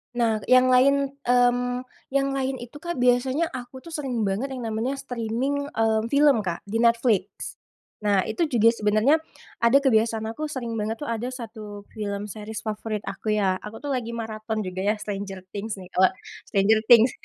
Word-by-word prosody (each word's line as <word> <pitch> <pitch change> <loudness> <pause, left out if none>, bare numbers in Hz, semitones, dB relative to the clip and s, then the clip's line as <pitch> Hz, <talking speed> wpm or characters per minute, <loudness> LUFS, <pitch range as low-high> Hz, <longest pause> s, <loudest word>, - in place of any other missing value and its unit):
Nah, 225 -3 +2
yang 255 0 +6
lain, 275 +2 +4 0.2
mmm, 245 0 +2 0.2
yang 275 0 0
lain 270 -1 -1
itu, 245 +4 -10
Kak, 345 +1 -4
biasanya 255 +6 +2
aku 255 +1 -8
tuh 335 - -10
sering 260 -7 -2
banget 200 +7 -1
yang 245 - -6
namanya 225 +5 -2
streaming, 265 +3 -2
eee, 220 -1 +2
film, 280 -2 +4
Kak, 175 -4 -3
di 220 +3 -3
Netflix. 230 -4 +1 0.4
Nah, 205 -3 +2
itu 335 -3 -1
juga 230 -4 +4
sebenarnya 215 +7 +3 0.4
ada 235 +4 +5
kebiasaan 225 -3 +2
aku 305 +6 -4
sering 250 -5 -4
banget 220 +2 -1
tuh - - -4
ada 230 +2 -2
satu 220 -5 -8
film 205 -1 -4
series 215 0 -7
favorit 215 -1 -3
aku 215 -1 -2
ya, 190 -3 +1
aku 225 +4 -9
tuh 285 - -2
lagi 240 -3 -2
maraton 220 -1 -4
juga 185 +1 -4
ya 215 - +3
Stranger 195 -2 -6
Things, 210 +1 -4
nih, 185 -2 -12
eee, 190 - +6 0.4
Stranger 205 +2 +3
Things. 240 +1 +7
230 Hz, 175 wpm, -25 LUFS, 215-255 Hz, 0.4 s, Things